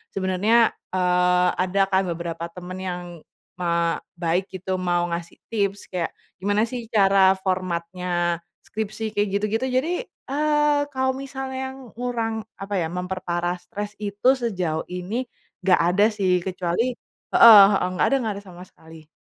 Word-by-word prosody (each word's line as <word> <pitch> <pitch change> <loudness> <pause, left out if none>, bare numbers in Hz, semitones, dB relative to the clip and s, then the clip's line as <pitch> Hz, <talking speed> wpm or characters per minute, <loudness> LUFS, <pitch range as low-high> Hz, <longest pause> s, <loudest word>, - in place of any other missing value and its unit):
sebenarnya, 195 +5 +3 0.2
eee, 180 0 +3
ada 185 +2 +1
kan, 190 0 +3
beberapa 170 0 -4
teman 180 +2 -9
yang, 180 -1 -4 0.6
ma 170 -1 +1 0.2
baik, 175 +2 0
gitu. 185 0 -3
Mau 175 -1 0
ngasih 170 0 -5 0.2
tips. 200 -3 -2
Kayak, 175 -2 -3 0.2
gimana 205 +3 +1
sih 235 -1 -4
cara 195 -2 +5
formatnya 175 -1 -1 0.2
skripsi, 220 0 -4
kayak 205 0 0
gitu-gitu. 215 +5 0
Jadi, 260 +7 0 0.2
eee, 295 0 +1
kalau 260 0 +2
misal 265 0 -6
yang 265 -2 -6
ngurang 225 -3 -2
apa 195 -1 -3
ya, 165 - 0
memperparah 180 0 -3
stres 205 +1 -6
itu 205 +5 +2
sejauh 180 -9 -2
ini, 195 +8 -4 0.3
nggak 185 0 +3
ada 200 +3 +4
sih, 190 -4 +1
kecuali 185 +7 -1 0.4
heeh 220 -4 +11
heeh, 195 - +1
nggak 150 -4 +2
ada 275 - +2
nggak 220 -4 -2
ada 200 - -16
sama 180 0 -11
sekali. 160 -3 -16
190 Hz, 145 wpm, -23 LUFS, 180-225 Hz, 0.6 s, heeh